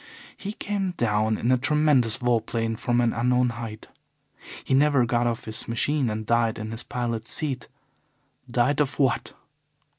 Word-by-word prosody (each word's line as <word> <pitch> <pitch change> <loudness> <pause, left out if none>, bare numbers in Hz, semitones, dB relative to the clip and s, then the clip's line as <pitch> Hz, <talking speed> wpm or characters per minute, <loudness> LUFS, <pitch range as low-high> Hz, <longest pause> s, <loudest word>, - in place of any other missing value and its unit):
He 205 +1 -6
came 200 -3 -2
down 110 -1 +1
in 120 - 0
a 130 - +3
tremendous 145 -5 +3
vol 120 -2 +1
plane 115 0 -2
from 120 +1 +1
an 120 -1 +2
unknown 125 +1 +2
height. 115 -2 -7 0.8
He - - -1
never 140 -2 +4
got 120 0 +1
off 115 -1 -3
his 110 0 -4
machine 130 +3 0
and 110 0 -3
died 115 0 +2
in 110 0 -5
his 115 +1 -3
pilot's 115 -3 -3
seat. 135 -6 -2 0.8
Died 125 +4 +1
of 140 -2 -1
what? 135 -4 +1
120 Hz, 160 wpm, -25 LUFS, 115-135 Hz, 0.8 s, never